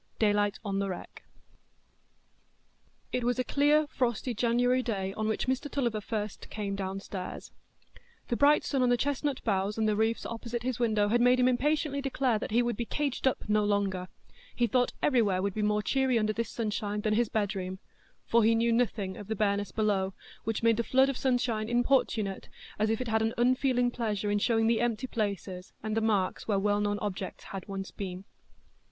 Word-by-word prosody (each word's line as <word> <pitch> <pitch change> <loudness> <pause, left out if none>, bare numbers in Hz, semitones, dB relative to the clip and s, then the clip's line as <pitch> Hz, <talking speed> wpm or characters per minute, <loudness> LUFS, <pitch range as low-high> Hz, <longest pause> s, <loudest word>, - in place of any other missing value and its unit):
Daylight 205 -2 +2
on 195 -1 -1
the 200 0 -1
Wreck 180 - -8 1.9
It 250 - -1
was 245 +1 +1
a 255 - +1
clear 295 +3 +3
frosty 245 -3 -1
January 245 +3 +2
day 195 -6 -2
on 215 +1 -2
which 220 - -1
Mr 260 +3 -1
Tulliver 240 -7 -1
first 210 -1 -4
came 200 -2 -3
downstairs. 195 -1 -5 0.8
The 240 - +1
bright 290 +4 +5
sun 270 -3 0
on 250 - +3
the 245 - +4
chestnut 285 +1 -1
boughs 200 -1 0
and 220 -1 +1
the 210 - +2
roofs 220 +2 0
opposite 235 0 -4
his 255 -1 -2
window 215 -3 +2
had 240 +2 +3
made 250 +1 +5
him 250 - +4
impatiently 280 +2 +1
declare 260 -4 0
that - - -4
he 235 +3 +3
would 240 -2 -1
be 235 - -2
caged 280 0 -1
up 260 - -1
no 210 0 +3
longer; 200 -3 0 0.5
he 240 - +2
thought 245 +1 +2
everywhere 220 -9 +3
would 200 +1 -1
be 215 - -2
more 210 0 +1
cheery 265 -1 +2
under 215 -1 +1
this 225 0 -2
sunshine 210 -2 -2
than 215 0 +1
his 230 0 +2
bedroom; 190 -3 -2 0.5
for 235 0 +3
he 225 +1 +4
knew 230 +1 +2
nothing 210 -5 0
of 205 - -9
the 220 - -2
bareness 200 -1 0
below, 195 -3 0 0.3
which 225 0 -2
made 230 -1 +4
the 235 - +1
flood 265 +3 +4
of 275 - -1
sunshine 240 -4 0
importunate, 240 -5 +1 0.3
as 215 +1 +2
if 225 +2 0
it 250 - -3
had 220 0 +1
an 225 +1 0
unfeeling 245 0 +2
pleasure 210 -4 -2
in 205 - +2
showing 225 +1 +2
the 225 0 +2
empty 240 0 0
places, 200 -6 -4
and 215 0 -2
the 225 - +1
marks 205 -4 0
where 205 -3 +2
well 205 +1 +1
known 205 0 0
objects 195 -2 -5 0.2
once 195 -1 -5
had - - -23
been. 190 -1 -5
220 Hz, 195 wpm, -29 LUFS, 205-245 Hz, 1.9 s, bright